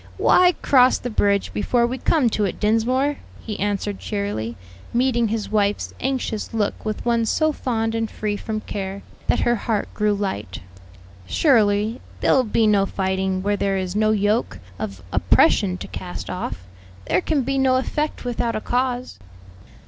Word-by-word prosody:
"Why 360 -1 +5
cross 255 -2 +5
the 245 - -5
bridge 200 -2 +1
before 235 +3 +1
we 255 +2 -3
come 300 -7 +2
to 210 - 0
it, 190 - -4
Dinsmore?" 250 +7 +1 0.2
he 215 -2 -6
answered 205 0 -2
cheerily, 200 - -3 0.4
meeting 240 -2 +2
his 215 -1 -3
wife's 205 -1 0
anxious 250 -5 -2
look 210 -2 -1
with 215 +1 -4
one 235 -1 +2
so 310 +7 +2
fond 225 -5 -2
and 225 -1 -1
free 210 -1 -3
from 215 +1 -4
care, 195 -1 -5 0.2
that - - +2
her 240 - +3
heart 220 -1 -2
grew 210 -1 +1
light; 105 - -4 0.7
"surely 220 - +2 0.2
there'll 260 - +3
be 225 0 +1
no 200 -2 +3
fighting 190 -1 -1
where 205 +1 +1
there 195 -1 0
is 185 0 -3
no 215 0 +3
yoke 210 +1 +1 0.2
of 100 -4 -5
oppression 90 -1 +3
to - - -7
cast - - -6
off. 90 +2 -5 0.4
There 180 - +2
can 290 - 0
be 270 +2 0
no 260 -1 +3
effect 295 +2 -2
without 240 -1 -1
a - - 0
cause." 250 +1 -2
215 Hz, 165 wpm, -22 LUFS, 200-245 Hz, 0.7 s, Why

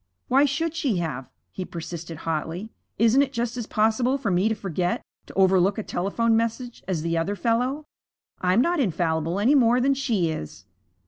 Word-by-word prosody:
'Why 275 +3 +5
should 300 +3 -1
she 270 - 0
have?' 135 -7 -4 0.2
he 185 - -5
persisted 165 -1 -7
hotly. 165 +5 -3 0.3
'Isn't 230 +4 +5
it 275 -1 0
just 240 -1 -2
as 240 -3 -4
possible 225 +5 +2
for 225 -8 -2
me 185 +4 +2
to 220 - 0
forget, 180 -3 -2 0.2
to - - -11
overlook 190 0 +4
a 220 - -2
telephone 225 +6 0
message, 230 +2 -2
as 175 -5 -1
the 165 0 0
other 195 +5 -1
fellow? 250 +7 0 0.5
I'm 185 +5 +3
not 345 +4 +1
infallible 165 - 0
any 235 +8 +4
more 245 -3 +4
than 275 +2 +3
she 225 -11 0
is.' 95 - -7
215 Hz, 180 wpm, -25 LUFS, 175-250 Hz, 0.5 s, Why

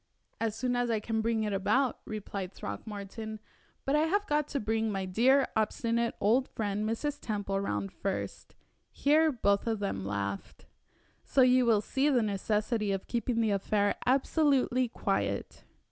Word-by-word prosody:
"As 225 -2 -1
soon 245 +2 -1
as 245 0 0
I 225 -2 +1
can 220 +1 -1
bring 225 0 0
it 210 -1 -1
about," 245 +6 +1
replied 200 -3 -5
Throckmorton; 215 +2 -6 0.5
"but 275 - +2
I 310 +2 +3
have 405 +4 +1
got 300 -4 +1
to 280 - -2
bring 220 0 0
my 195 -1 -2
dear, 255 +9 +4
obstinate 230 +2 0
old 245 +6 +3
friend 210 0 -2
Mrs. 290 +6 -2
Temple 205 -3 -2
round 105 - -2
first" 195 -1 -4 0.4
here 310 +2 +3
both 200 -5 +1
of 225 -1 +1
them 195 - -3
laughed 100 0 -4 0.6
"so 270 - +2
you 255 -1 +5
will 220 -3 +4
see 270 +7 +1
the 250 -5 +3
necessity 210 +1 0
of 195 -1 -2
keeping 235 -1 -1
the 220 -2 +2
affair 205 +1 +1
absolutely 265 -1 +2
quiet." 230 - -2
225 Hz, 160 wpm, -30 LUFS, 205-255 Hz, 0.6 s, you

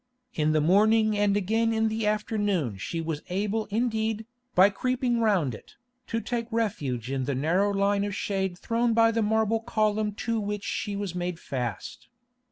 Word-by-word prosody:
In 155 -1 +1
the 155 0 +2
morning 215 +6 +4
and 205 -1 +2
again 225 +3 +1
in 225 0 +2
the 220 0 -1
afternoon 205 - 0
she 165 - -3
was 160 -2 -3
able 210 +4 -1
indeed, 220 0 -1 0.3
by 190 +3 +7
creeping 255 +2 0
round 195 - +2
it, - - -12 0.3
to 230 - -1
take 235 -1 -3
refuge 140 - -2
in 135 -1 -1
the 140 0 -1
narrow 175 +9 +2
line 200 0 +1
of 205 -1 -3
shade 190 -3 -2
thrown 230 +3 0
by 225 0 +5
the 230 0 0
marble 220 +1 +2
column 215 -2 0
to 225 +2 -2
which 205 -1 -3
she 205 - -3
was 200 -3 -3
made 175 -1 -3
fast. 120 -9 -5
205 Hz, 175 wpm, -27 LUFS, 180-225 Hz, 0.3 s, by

